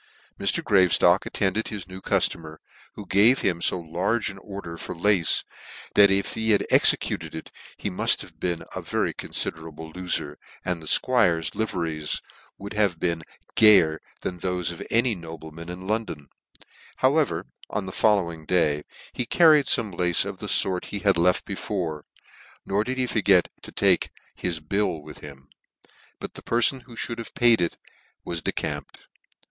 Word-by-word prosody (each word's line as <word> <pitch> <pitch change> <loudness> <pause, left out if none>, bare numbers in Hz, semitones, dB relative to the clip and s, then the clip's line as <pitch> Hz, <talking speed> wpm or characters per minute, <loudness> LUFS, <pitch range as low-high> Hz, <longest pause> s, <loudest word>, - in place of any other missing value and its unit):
Mr. - - +1
Graveftock 90 -1 +4
attended 100 +3 0
his 100 -5 -6
new 95 0 -10
customer, 80 -4 -1 0.4
who 105 - -8
gave 105 +8 +4
him 85 -3 0
fo - - +3
large 90 +8 -1
an 95 - -12
order 95 -4 -8
for 85 - -7
lace, 90 -1 +2 0.5
that 100 -1 +7
if 95 0 +1
he 110 0 -2
had 105 -2 +3
executed - - +2
it, - - -8 0.3
he - - -4
muft - - +3
have - - -13
been 85 -2 -2
a - - -4
very - - -1
confiderable 80 0 -4
lofer, 90 -5 -1 0.3
and 90 -2 -2
the 80 - -9
'Squire's 85 -10 +2
liveries 85 -8 -2 0.4
would 100 +2 -8
have 100 -5 +1
been 85 -2 -1 0.3
gayer 90 -8 +6 0.2
than 90 -1 -4
thofe 90 -1 -1
of 85 - -9
any 120 +1 +2
nobleman 80 -2 -9
in 90 +1 -7
London: 105 -9 -3 0.7
however, 145 +3 +1 0.2
on 100 - -3
the 95 - -6
following 90 -7 +1
day, 75 -4 +1 0.3
he - - -2
carried 155 +2 +5
fome 105 -5 +1
lace 90 -1 +2
of - - -6
the - - -5
fort 90 -2 +2
he 105 - -5
had 100 -2 +3
left 90 +1 +2
before; 90 -6 -4 0.6
nor 100 +2 0
did 130 +3 -4
he 130 - +1
forget 100 -7 +3
to - - -10
take - - +2 0.2
his 85 -3 -3
bill 90 +1 -1
with 75 - -11
him; 70 -2 -12 0.7
but - - -7
the - - -10
perfon 120 +3 +1
who 120 - -13
mould 115 0 -6
have 115 - -8
paid 120 -5 +4
it 85 - -1 0.5
was 85 -1 -3
decamped. - - -4
90 Hz, 165 wpm, -25 LUFS, 85-105 Hz, 0.7 s, that